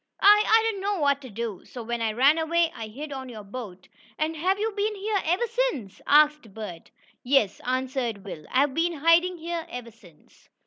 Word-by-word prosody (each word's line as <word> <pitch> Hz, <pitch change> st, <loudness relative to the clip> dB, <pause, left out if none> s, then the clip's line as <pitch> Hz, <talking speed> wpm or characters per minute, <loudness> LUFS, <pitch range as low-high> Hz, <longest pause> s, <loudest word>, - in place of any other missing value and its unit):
I 415 Hz, +1 st, +7 dB
I 445 Hz, 0 st, +5 dB
didn't 425 Hz, -4 st, -1 dB
know 405 Hz, 0 st, -1 dB
what 280 Hz, -1 st, +2 dB
to 260 Hz, -, -10 dB
do, 220 Hz, -2 st, -5 dB
so 245 Hz, -, -9 dB
when 235 Hz, +1 st, -3 dB
I 220 Hz, -1 st, 0 dB
ran 275 Hz, +7 st, +4 dB
away, 330 Hz, +1 st, +1 dB
I 220 Hz, -, -6 dB
hid 285 Hz, +8 st, -8 dB
on 265 Hz, -1 st, -6 dB
your 220 Hz, -3 st, -9 dB
boat." 200 Hz, -4 st, -9 dB, 0.3 s
"And 315 Hz, +1 st, -1 dB
have 370 Hz, +5 st, +1 dB
you 440 Hz, +2 st, -1 dB
been 420 Hz, +1 st, -1 dB
here 405 Hz, 0 st, -1 dB
ever 360 Hz, +8 st, +1 dB
since?" 465 Hz, -, -2 dB
asked 300 Hz, -7 st, +4 dB
Bert. 205 Hz, -7 st, -8 dB, 0.3 s
"Yes," 245 Hz, -6 st, +2 dB
answered 255 Hz, -5 st, -2 dB
Will. 160 Hz, -6 st, -8 dB
"I've 270 Hz, +2 st, +2 dB
been 335 Hz, +3 st, +1 dB
hiding 335 Hz, +4 st, +3 dB
here 335 Hz, 0 st, -4 dB
ever 245 Hz, -4 st, -7 dB
since." 175 Hz, -9 st, -22 dB
280 Hz, 195 wpm, -26 LUFS, 230-345 Hz, 0.3 s, I